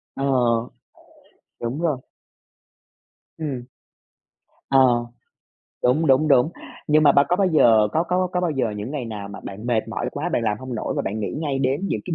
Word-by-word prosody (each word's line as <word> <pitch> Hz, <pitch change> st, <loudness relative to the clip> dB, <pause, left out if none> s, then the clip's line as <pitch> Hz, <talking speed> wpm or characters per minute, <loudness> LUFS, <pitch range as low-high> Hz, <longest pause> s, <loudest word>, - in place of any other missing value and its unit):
Ờ, 135 Hz, -, -2 dB, 1.3 s
đúng 120 Hz, +6 st, -3 dB
rồi. 155 Hz, -6 st, +1 dB, 1.4 s
Ừm. 135 Hz, -6 st, -4 dB, 1.1 s
Ờ, 125 Hz, -3 st, +4 dB, 0.8 s
đúng, 150 Hz, +6 st, +3 dB
đúng, 135 Hz, +3 st, +4 dB
đúng. 140 Hz, +2 st, +4 dB, 0.4 s
Nhưng 155 Hz, +1 st, +4 dB
mà 145 Hz, -2 st, +6 dB
ba 140 Hz, +1 st, +5 dB
có 180 Hz, -, +2 dB
bao 195 Hz, 0 st, +2 dB
giờ 115 Hz, -11 st, +5 dB
có 160 Hz, -, +2 dB
có 180 Hz, +2 st, 0 dB
có 180 Hz, -, 0 dB
bao 175 Hz, -, 0 dB
giờ 135 Hz, -6 st, -1 dB
những 105 Hz, +6 st, -5 dB
ngày 145 Hz, -4 st, -4 dB
nào 105 Hz, -3 st, -6 dB
mà 100 Hz, -, -9 dB
bạn 100 Hz, +4 st, -7 dB
mệt 115 Hz, -2 st, 0 dB
mỏi 110 Hz, -, -3 dB
quá, 155 Hz, +5 st, -3 dB
bạn 120 Hz, -, 0 dB
làm 105 Hz, -2 st, 0 dB
hông 130 Hz, -1 st, -6 dB
nổi 110 Hz, -, -3 dB
và -, -, 0 dB
bạn 105 Hz, +3 st, -3 dB
nghĩ 100 Hz, -, -3 dB
ngay 145 Hz, -4 st, -1 dB
đến 135 Hz, +2 st, 0 dB
những -, -, -2 dB
cái 175 Hz, -, -2 dB
135 Hz, 190 wpm, -22 LUFS, 115-155 Hz, 1.4 s, mà